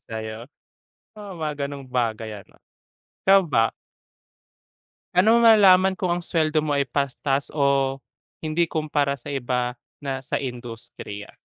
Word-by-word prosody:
tayo? 110 +1 -6 0.7
Oo, 200 -3 -8
mga 150 -3 -3
gano'ng 140 -1 -8
bagay 115 -3 -1
ano, - - -19 0.7
ikaw 195 +1 +7
ba? 115 -5 +2 1.4
Pa'no 215 +6 +5
mo 235 - +4
malalaman 190 -4 +7
kung 185 0 -3
ang 175 0 0
suweldo 155 -2 +1
mo 150 - -1
ay 140 -2 +1
patas 140 0 -1
o 140 -2 +1 0.4
hindi 160 +2 +1
kumpara 150 -3 0
sa 140 +1 -8
iba 125 -2 -2 0.2
na 135 -1 -4
sa - - -2
industriya? 120 -5 -7
140 Hz, 130 wpm, -24 LUFS, 125-165 Hz, 1.4 s, ikaw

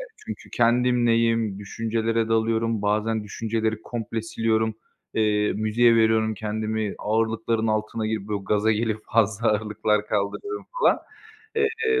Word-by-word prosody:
E - - -5 0.2
çünkü - - -8
kendimleyim. 115 -3 +2
Düşüncelere 115 +2 -1
dalıyorum, 115 -1 +1
bazen 110 +1 0
düşünceleri 110 +1 -2
komple 115 -1 -4
siliyorum. 110 -1 0 0.4
Eee, 105 -1 +2
müziğe 115 +2 +3
veriyorum 110 -1 +3
kendimi, 110 0 -2
ağırlıkların 115 +1 0
altına 110 0 -1
girip, 110 -2 -3
böyle, 105 -1 -1
gaza 105 +2 +2
gelip 110 0 -1
fazla 110 0 +2
ağırlıklar 105 0 0
kaldırıyorum 110 - -3
falan. - - +4 0.6
Eee, 445 0 +1
110 Hz, 120 wpm, -24 LUFS, 105-115 Hz, 0.6 s, falan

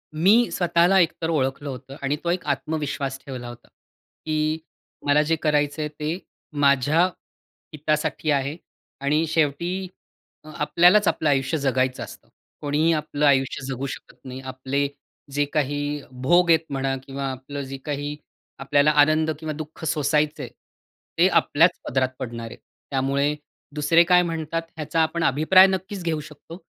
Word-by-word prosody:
मी 205 +9 +4
स्वतःला 175 +2 +3
एक 170 -2 +4
तर 160 - -1
ओळखलं 140 -2 -1
होतं 135 +1 -8
आणि 140 +1 0
तो 170 - -1
एक 180 - -2
आत्मविश्वास 140 -2 -2
ठेवला 125 -3 -7
होता, 120 0 -11
की 155 0 -4 0.5
मला 145 +1 +4
जे 165 +2 +1
करायचं 150 0 +1
आहे 150 - -2
ते 150 +3 -4 0.4
माझ्या 140 +3 +4 0.7
हितासाठी 155 0 -1
आहे 140 +2 0 0.5
आणि 150 +3 +2
शेवटी 170 +5 0 0.7
आपल्यालाच 175 +7 +4
आपलं 155 - +1
आयुष्य 135 +2 +1
जगायचं 130 -2 0
असतं. - - -12 0.3
कोणीही 150 +3 +2
आपलं 150 -1 -1
आयुष्य 135 -1 +2
जगू 135 0 -4
शकत - - -9
नाही. 130 0 -7
आपले 130 +2 -2 0.4
जे 145 +1 +1
काही 145 0 -1 0.2
भोग 175 +5 +4
आहेत 160 - +6
म्हणा 135 -1 -1
किंवा 135 0 -5
आपलं 135 +2 -7
जे 135 0 -6
काही 145 0 -3 0.4
आपल्याला 145 +2 +3
आनंद 155 +2 +3
किंवा 155 -1 -4
दुःख 155 +1 -9
सोसायचं 150 0 0
आहे, - - -7 0.7
ते 175 +3 +6
आपल्याच 170 -1 +3
पदरात 130 0 +1
पडणार 120 -3 -5
आहे. - - -10 0.3
त्यामुळे 140 +2 +1 0.4
दुसरे 155 +3 +4
काय 180 +1 +5
म्हणतात 165 -1 -3
ह्याचा 155 +1 -2
आपण 160 +1 0
अभिप्राय 170 +6 +6
नक्कीच 190 0 -3
घेऊ 165 -2 -1
शकतो. 150 +2 -11
150 Hz, 145 wpm, -23 LUFS, 140-160 Hz, 0.7 s, आहेत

